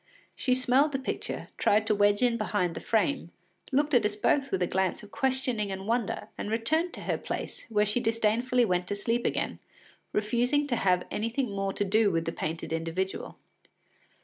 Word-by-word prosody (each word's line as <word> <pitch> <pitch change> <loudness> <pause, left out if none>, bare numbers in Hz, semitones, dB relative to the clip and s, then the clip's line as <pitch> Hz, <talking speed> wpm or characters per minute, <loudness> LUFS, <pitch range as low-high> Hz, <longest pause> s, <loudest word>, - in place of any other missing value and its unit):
She 255 -2 +1
smelled 260 +4 +3
the - - +1
picture, 265 - -4
tried 215 +1 +3
to 220 - +2
wedge 205 +2 +3
in 240 -2 +3
behind 205 -6 0
the - - -5
frame, 225 -2 0 0.4
looked 290 +3 +2
at 240 -3 +5
us 210 0 0
both 275 +6 +2
with 185 -6 0
a - - +3
glance 190 +3 -1
of 205 - -13
questioning 255 -6 0
and 190 0 -5
wonder, 230 -1 -1
and - - -3
returned 310 +11 +1
to - - -8
her - - -1
place, - - -5
where 210 -2 +3
she 210 +4 +1
disdainfully 230 +2 +2
went 180 -3 0
to 205 - -2
sleep 230 +4 0
again, - - -2 0.5
refusing 240 +7 +1
to 265 -4 0
have 180 -4 +2
anything 230 +2 -1
more 195 0 -1
to 205 - -1
do 215 +2 +3
with 165 -3 0
the 165 - -1
painted 165 0 -4
individual. 165 +4 -3
215 Hz, 190 wpm, -28 LUFS, 195-250 Hz, 0.5 s, at